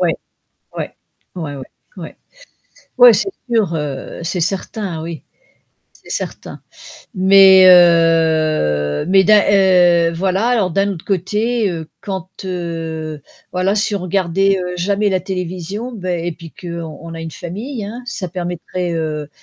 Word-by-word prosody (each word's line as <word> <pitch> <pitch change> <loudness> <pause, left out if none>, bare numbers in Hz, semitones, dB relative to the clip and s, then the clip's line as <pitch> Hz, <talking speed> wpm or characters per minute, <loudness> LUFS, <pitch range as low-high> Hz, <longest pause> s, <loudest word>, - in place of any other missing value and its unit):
Ouais. 170 -3 +2 0.6
Ouais. - - -5 0.4
ouais, 160 -5 -5
ouais, 135 - -8 0.3
ouais. - - -9 0.8
Ouais 245 -1 +9
c'est 390 - 0 0.2
sûr, 215 -8 +1
heu, 150 -1 -5
c'est 175 +2 -2
certain 185 -1 -3
oui, 165 -1 -7 0.7
c'est - - -18
certain. - - -5 0.5
Mais, 190 0 +7
heu, 160 - +4
mais 190 +1 +5
d'un 210 0 +6
heu, 180 -4 +4
voilà 190 +6 0
alors 215 -7 +1
d'un 195 +3 +1
autre 170 - -9
côté, 210 +4 0
heu, 160 -2 -6
quand, 190 -3 -5 0.2
heu, 165 -4 -5 0.3
voilà, 185 +2 +1
si 210 0 0
on 200 - -2
regardait, 190 +1 +1
heu, 180 0 -4
jamais 200 +3 0
la 185 -1 0
télévision, 185 +5 -5
bah, 185 -5 -4
et 170 0 -2
puis 165 -1 -13
qu'on 170 -4 -7
on 165 0 -8
a 165 - -7
une 165 - -6
famille, 210 +7 -6
hein, 235 +5 -7
ça 195 -6 -4
permettrait, 175 0 -4
heu, 155 -2 -3
180 Hz, 145 wpm, -17 LUFS, 165-195 Hz, 0.8 s, Ouais